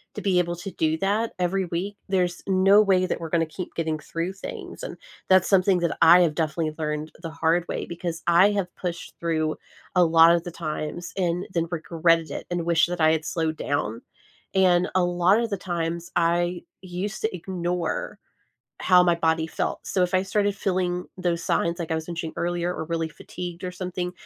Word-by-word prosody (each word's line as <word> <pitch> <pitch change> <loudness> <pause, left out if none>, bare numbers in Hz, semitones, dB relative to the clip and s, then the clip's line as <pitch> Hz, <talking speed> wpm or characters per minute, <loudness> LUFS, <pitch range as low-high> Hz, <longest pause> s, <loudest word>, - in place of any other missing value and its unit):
to - - -4
be 190 -3 +2
able 175 -1 0
to 185 +3 -7
do 160 0 0
that 210 +4 0
every 185 +1 0
week, 180 +4 -3
there's 180 -2 0
no 195 +2 +5
way 190 -3 +3
that 180 - -2
we're 165 - -5
gonna 165 0 +2
keep 175 +3 -8
getting 160 -2 -1
through 165 +4 -4
things, 190 - -8
and - - -6 0.3
that's 185 -1 +5
something 190 -1 +4
that 170 -2 0
I 170 +2 +8
have 155 -4 +2
definitely 160 -1 -1
learned 150 0 -3
the 165 - -5
hard 165 +2 +1
way - - -3
because 170 -1 -5
I 175 +4 +6
have 195 -3 -2
pushed 175 -1 -5
through 160 -2 -1 0.4
a 180 - +6
lotta 165 +1 +6
the 175 - -5
times 155 +1 -5
and 180 -1 0
then 170 -1 0
regretted 165 -1 +1
it - - -6
and 175 -1 -2
wished 170 0 +3
that 175 -1 -3
I 155 0 +5
had 160 -1 0
slowed 160 -2 -1
down 115 -6 -2 0.5
and 180 -2 +4
a 185 - +4
lotta 180 +6 +3
the 200 - -2
times, 170 -2 -3
I 175 +1 +1 0.2
used 185 +3 -5
to 220 -4 -1
ignore 175 -2 -3 0.6
how 180 -1 +6
my 175 -1 +3
body 160 -1 +1
felt. - - -3
So, 185 - +1
if 180 +1 0
I 185 - +4
started 205 +1 0
feeling 180 -2 -1
those 175 -2 -1
signs, 170 0 0
like 170 -2 -5
I - - +1
was 160 +1 -5
mentioning 165 -1 -4
earlier 175 0 -1
or - - -4
really 165 0 -2
fatigued 175 +2 -8
or 180 - -2
something, 180 -1 -4
175 Hz, 195 wpm, -25 LUFS, 165-185 Hz, 0.6 s, I